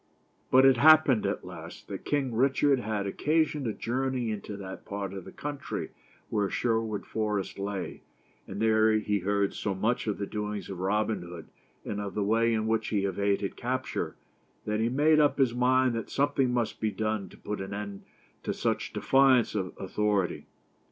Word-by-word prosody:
But 130 +1 +6
it 135 -2 +6
happened, 145 -6 +6
at 100 - -3
last, 85 -2 -10
that 100 -2 -6
King 135 -4 0
Richard 135 +3 +3
had 110 -4 -2
oc 100 - -5
casion 155 -2 +1
to 115 - 0
journey 125 +1 -1
into 105 -1 -5
that 95 -1 -8
part 100 -1 -5
of 95 -2 -7
the - - -9
country 145 -1 -5 0.4
where 100 -2 +1
Sherwood 115 -3 -1
Forest 105 -3 -2
lay; 100 -1 -4 0.5
and 95 - -6
there 110 0 +4
he 105 -1 +1
heard 100 +1 0
so 100 -2 -2
much 110 +5 0
of 105 - -1
the 100 - -2
doings 105 -1 -4
of 95 - -6
Robin 105 +1 0
Hood, 85 -2 -9 0.4
and 105 - -3
of 100 -1 -5
the 105 - 0
way 115 +3 +2
in 110 -1 0
which 110 0 0
he 100 -2 0
evaded 100 +1 0
capture, 130 +2 -3 0.5
that 105 0 -1
he 115 +1 +2
made 150 +4 +4
up 145 -1 +3
his 130 -4 +3
mind 130 +1 +3
that 115 -1 -4
something 140 -2 +1
must 120 -2 -1
be 110 - +1
done 110 0 -2
to - - -15
put 105 -1 -5
an 95 +1 -6
end 100 -1 -5 0.4
to - - -3
such - - -1
defi 135 - 0
ance 130 -4 +5
of 95 -4 -2
authority. 100 -1 -1
110 Hz, 185 wpm, -28 LUFS, 100-125 Hz, 0.5 s, But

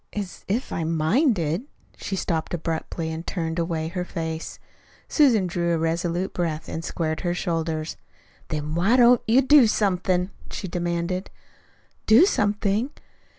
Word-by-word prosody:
"As 200 -3 -5
if 225 +7 -1
I'd 165 - -2
minded 170 - +1
" - - -32
She 195 - -4
stopped 170 -3 -2
abruptly 165 0 -3
and 160 0 -4
turned 165 -2 -2
away 165 -2 -1
her 180 +1 -3
face. 160 -2 -5 0.5
Susan 245 - +4
drew 170 -1 0
a - - 0
resolute 170 +3 -1
breath 160 -3 -2
and 165 - -5
squared 155 -2 -2
her 175 -1 -1
shoulders. 165 -2 -2 0.5
"Then 150 0 -3
why 185 +9 +3
don't 245 -1 +6
you 250 +5 +5
do 270 -2 +7
somethin'?" 185 -3 +1 0.2
she 190 - -5
demanded. 175 +1 -2 0.8
"Do 235 +11 +8
something?" 210 - +1
175 Hz, 145 wpm, -24 LUFS, 165-205 Hz, 0.8 s, Do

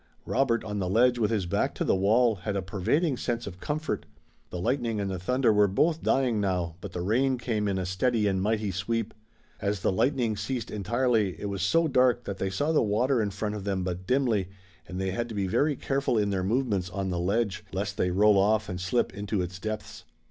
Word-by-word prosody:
Robert 120 -3 +1
on 105 -1 -4
the 90 -2 -1
ledge 120 +4 +3
with 105 -3 +2
his 105 -5 0
back 85 - 0
to - - -1
the - - +2
wall 110 +4 +3
had 100 +3 -4
a 100 - -1
pervading 125 - 0
sense 120 -1 -2
of 90 -2 -8
comfort. 155 +6 -3 0.4
The 90 - -5
lightning 115 +1 0
and 100 -1 -2
the 95 - -3
thunder 125 +4 +2
were 105 0 +5
both 155 - +1
dying 125 -5 +2
now, 90 -4 -1
but 100 -4 -7
the 90 - -3
rain 130 +7 +2
came 110 -3 -1
in 100 -1 0
a 95 - -2
steady 105 +5 +1
and 95 -2 +1
mighty 105 0 0
sweep. 110 +4 -2 0.5
As 100 -2 -1
the - - +2
lightning 120 +2 +1
ceased 115 +3 -4
entirely 110 -1 0
it 100 - -3
was 100 -1 -3
so 165 - +3
dark 125 -4 +3
that 100 - -5
they 95 - -1
saw 145 +12 0
the 155 - +3
water 120 +4 +2
in 105 - 0
front 105 +1 -3
of 105 -2 -5
them 95 -2 -1
but 90 0 -4
dimly, 120 -8 +1 0.4
and 90 0 -6
they 95 0 -1
had 120 +5 -3
to 110 - -6
be 100 -1 0
very 145 +10 +1
careful 135 -2 0
in 105 -1 +1
their 95 -2 -1
movements 105 -4 0
on 95 0 -3
the 90 - -1
ledge, 100 +2 0
lest 100 +1 -3
they 90 - +1
roll 100 +2 +4
off 105 +1 +2
and 90 0 -4
slip 95 +5 0
into 100 -1 -2
its 90 +2 -6
depths. 110 +1 -5
105 Hz, 230 wpm, -27 LUFS, 95-120 Hz, 0.5 s, were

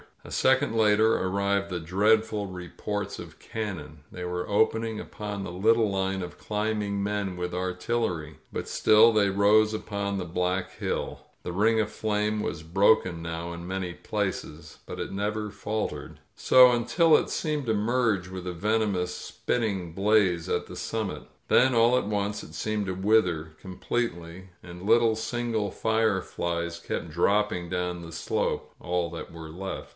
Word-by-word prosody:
A - - -11
second 130 -3 +2
later 110 0 +4
arrived 100 +1 0
the 90 -2 -3
dreadful 105 +5 +2
re 90 -2 -8
ports 105 -1 -4
of - - -10
cannon. 90 -9 -6
They 90 - -7
were 90 0 -3
opening 110 +1 +1
upon 105 -2 -6
the 85 - -5
little 110 +4 +3
line 95 0 -1
of 90 - -8
climbing 105 -1 -2
men 100 -3 -2
with 90 0 -3
artillery! 90 -3 -2 0.2
But - - -4
still 110 +2 +5
they 105 -3 +3
rose 105 +2 +4
upon 100 -2 -3
the 90 - -3
black 90 +2 -2
hiU. - - -2 0.2
The - - -5
ring 110 +4 +3
of 110 0 0
flame 105 0 -1
was 80 - -3
broken 95 0 +3
now 85 +1 -4
in 85 +1 -8
many 95 -1 -3
places, 100 +1 -4
but - - -7
it - - -4
never 105 +2 -2
faltered. 105 +2 -4 0.2
So 125 -1 +7
until 120 +8 +4
it - - -2
seemed 150 -3 -1
to 110 - +1
merge 110 -3 +1
with 95 -1 -7
the 90 - -3
venomous 100 -1 0
spitting 100 -8 -2
blaze 95 -3 +2
at - - -1
the - - -9
summit. 110 -4 -3 0.2
Then 130 +1 +5
all 120 +2 +5
at 115 - -1
once 105 0 -2
it 80 - -12
seemed 105 +3 -2
to 95 - -1
wither 90 -5 +1
com 95 -2 -9
pletely, 95 -6 -3 0.2
and 90 0 -10
little 115 +1 +4
single 115 -2 -2
fireflies 90 -6 -1
kept 85 - -4
dropping 90 +1 +1
down 90 -1 -2
the 80 - -9
slope 85 - -2
— - - -35
all 90 -1 -1
that 85 - -7
were 80 -1 -9
left. 95 +4 -6
100 Hz, 165 wpm, -27 LUFS, 90-110 Hz, 0.2 s, So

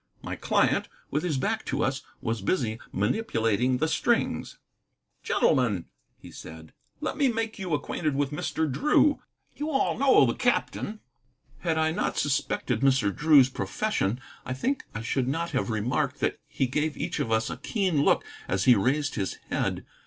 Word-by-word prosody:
My - - -4
client, - - +1 0.2
with 150 - 0
his 155 -5 -1
back 220 +11 -1
to - - 0
us, 135 +1 -1 0.2
was 115 -2 -1
busy 110 - 0
manipulating 115 - +1
the 160 - +1
strings. 160 - 0 0.6
"Gentlemen," 105 -9 +2 0.3
he - - -13
said, 80 0 -11 0.3
"let - - -2
me 285 -3 +3
make 225 -2 -2
you 180 -5 -1
acquainted 150 0 -2
with 140 0 0
Mr. 160 +2 -1
Drew. 290 - +3 0.3
You 300 +1 -3
all 270 -3 +1
know 270 -1 +6
the - - +1
captain." 230 -3 -1 0.6
Had 165 -2 0
I 160 0 +2
not 160 - -1
suspected 135 -4 0
Mr. 130 -7 +3
Drew's 150 -3 +6
profession, 130 - -1 0.2
I 130 - -4
think 265 - -1
I 115 - -4
should 125 +2 0
not 165 +5 -1
have 130 -4 -1
remarked 110 +3 -1
that - - 0
he 135 - 0
gave 150 +4 -1
each - - -3
of 130 -6 -1
us 110 0 +1
a - - -5
keen 185 -9 0
look - - +3 0.2
as 95 0 0
he 125 - +7
raised 140 +7 +1
his 95 -4 -2 0.2
head. - - -1
140 Hz, 165 wpm, -27 LUFS, 115-180 Hz, 0.6 s, he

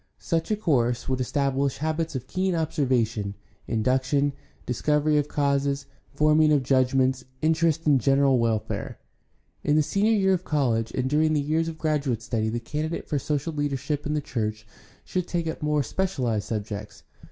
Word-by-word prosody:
Such 165 -2 -2
a 215 - +2
course 125 - +1
would 130 -1 0
establish 140 +1 0
habits 160 +1 -2
of 130 -1 -4
keen 185 +4 -1
observation, 120 -10 0 0.3
induction, 130 +5 +1 0.3
discovery 150 +4 +2
of 145 - -1
causes, 140 -1 0 0.2
forming 155 0 +4
of 145 -3 +3
judgments, 130 0 +2 0.2
interest 160 0 +2
in 145 -3 +5
general 135 +1 +3
welfare. 115 -2 -1 0.7
In 150 - +2
the 155 - +4
Senior 205 +8 +2
year 190 -3 +3
of 185 -1 -1
college 120 -8 0
and 130 0 -1
during 155 +3 +2
the 150 - +2
years 155 +3 0
of 165 -1 -5
graduate 145 -7 -1
study 110 -2 -1
the 120 +2 -2
candidate 155 +7 -4
for 145 - 0
social 150 +3 -2
leader 145 -2 -1
ship 145 +2 -3
in 150 - -1
the 150 - 0
church 110 -4 -3 0.4
should 180 -1 -2
take 170 -2 -1
up 160 - -4
more 150 -1 +1
specialized 125 - -1
subjects. 105 -2 -5
140 Hz, 165 wpm, -25 LUFS, 125-155 Hz, 0.7 s, in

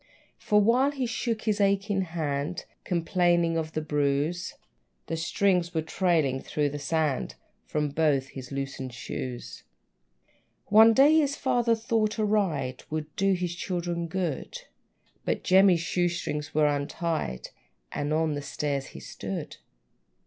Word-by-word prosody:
For 210 -1 +3
while 240 +6 +4
he 275 -3 -2
shook 230 -1 -2
his 215 -2 +1
aching 200 0 +2
hand, 160 -2 -3 0.2
Complaining 175 -1 +2
of 160 -1 -2
the 155 - -2
bruise, 150 +4 0 0.5
The 165 - -3
strings 175 +1 +1
were 160 - +1
trailing 160 -6 +1
through 150 -1 -1
the 145 +1 -5
sand 150 -1 -1 0.3
From 150 -1 -1
both 140 -3 +1
his 130 -1 -9
loosened 135 -2 -5
shoes. 125 0 -6 1.1
One 220 +2 +8
day, 290 +6 +6
his 285 -2 +1
father 240 -4 +2
thought 220 -1 0
a 215 - +1
ride 160 -12 0
Would 155 -1 -4
do 195 0 +2
his 180 -1 -2
children 175 -2 -3
good; 175 -4 -3 0.6
But - - -1
Jemmy's 185 -2 +5
shoe 175 +1 +1
strings 150 -3 -4
were 155 -1 +4
untied, 145 - -2 0.4
And 145 +1 -2
on 155 0 +1
the 145 - -3
stairs 140 -1 -3
he - - -7
stood. - - -6
170 Hz, 140 wpm, -27 LUFS, 145-195 Hz, 1.1 s, One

